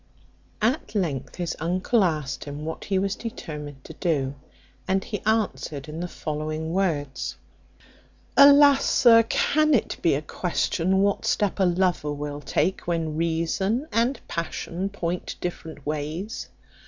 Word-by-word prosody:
At 230 0 0
length 140 -9 -2
his 175 -2 -3
uncle 185 +7 +2
asked 155 -6 -1
him 145 +1 -6
what 160 - -5
he 195 - 0
was 195 +1 0
determined 150 - -7
to - - -10
do, 140 -6 0 0.5
and 190 0 +1
he 210 - -4
answered 200 -10 0
in 155 +2 -6
the 175 - -2
following 155 0 -4
words: 155 -8 -1 1.0
"Alas! 280 0 +8
sir, 230 -2 +6
can 305 +6 +2
it 225 - -1
be 165 - +3
a 145 - -3
question 180 +3 0
what 200 0 +1
step 205 -1 +1
a 190 - +4
lover 175 -4 +1
will 145 0 -5
take, 160 +8 -1
when 165 -3 -1
reason 170 - 0
and 235 +5 +1
passion 170 +3 -3
point 180 -3 -3
different 160 -4 -6
ways? 155 +8 -4
175 Hz, 140 wpm, -25 LUFS, 150-200 Hz, 1.0 s, Alas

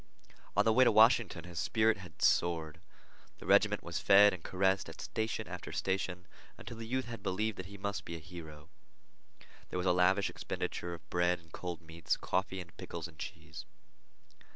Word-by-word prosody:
On - - +5
the 110 - +4
way 130 +3 +6
to 125 - +5
Washington 110 -5 +5
his 85 -1 -6
spirit 110 0 +2
had 90 -5 -9
soared. 80 -3 +2 0.6
The - - -12
regiment - - +4
was - - -3
fed 100 +1 +7
and 90 - -6
caressed 95 -1 +1
at 80 - -11
station 110 -1 -3
after - - -7
station 95 -2 -2 0.3
until 115 - -9
the 115 0 -7
youth 130 +2 -1
had 115 -1 -7
believed 110 +3 -1
that 95 - -6
he 100 +1 -10
must 100 +1 -3
be 85 - -6
a - - -6
hero. 80 -2 -11 1.0
There - - -3
was 90 - -1
a 90 - +4
lavish 95 +3 +3
expenditure 85 0 -4
of 85 - -17
bread 90 0 +2
and 80 -2 -21
cold 90 0 -5
meats, 80 -1 -2
coffee, 95 0 -1
and 85 -2 -10
pickles 85 0 -6
and 80 -3 -18
cheese. - - -8
90 Hz, 185 wpm, -33 LUFS, 85-105 Hz, 1.0 s, fed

